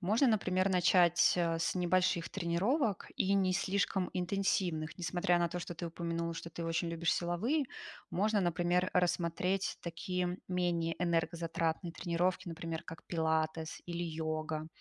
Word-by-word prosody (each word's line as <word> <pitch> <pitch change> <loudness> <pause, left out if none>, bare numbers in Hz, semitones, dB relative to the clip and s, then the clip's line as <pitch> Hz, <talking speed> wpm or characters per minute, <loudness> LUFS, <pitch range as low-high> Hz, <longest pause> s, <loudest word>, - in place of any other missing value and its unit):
Можно, 215 +9 +3
например, 190 -4 +2
начать, 175 -1 +5
а, 165 -1 +1
с 165 +2 0
небольших 180 -1 +2
тренировок, 200 - 0
и 195 - +2
не 190 -2 +3
слишком 190 -1 0
интенсивных. 180 -3 0
Несмотря 175 0 +1
на 170 0 +2
то, 175 +1 -4
что 175 - -6
ты 170 - -4
упомянула, 170 0 -3
что 165 - -7
ты 170 - -5
очень 165 +1 0
любишь 165 -1 +1
силовые, 225 - 0 0.4
можно, 210 +2 +2
например, 175 +1 +1
рассмотреть 180 +2 +1
такие, 180 +1 -3
менее 175 -2 0
энергозатратные 165 -1 0
тренировки, 180 +1 -1
например, 165 0 -4
как 165 - -10
пилатес, 160 -1 -1
или 175 0 -3
йога. 155 -1 -3
175 Hz, 140 wpm, -33 LUFS, 165-185 Hz, 0.4 s, начать